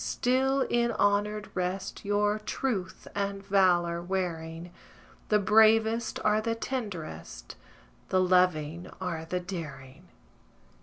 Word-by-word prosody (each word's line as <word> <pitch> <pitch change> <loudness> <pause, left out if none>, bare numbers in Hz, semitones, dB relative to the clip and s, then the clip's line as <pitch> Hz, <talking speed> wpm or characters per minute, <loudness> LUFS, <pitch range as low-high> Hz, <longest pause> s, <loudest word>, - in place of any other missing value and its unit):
still 265 +2 +1
in 240 -2 +1
honoured 210 0 +1
rest 185 +1 -3
Your 205 +1 +1
truth 215 -4 -3
and 200 -1 -3
valour 175 -4 +3
wearing: 170 -2 -4 0.6
The 210 - +5
bravest 220 +2 +4
are 215 0 +3
the 230 +1 -1
tenderest, 185 - -6 0.5
The 185 - +3
loving 180 -3 +2
are 170 -3 -4
the 180 +2 -2
daring. 165 -4 -8
195 Hz, 105 wpm, -28 LUFS, 175-215 Hz, 0.6 s, The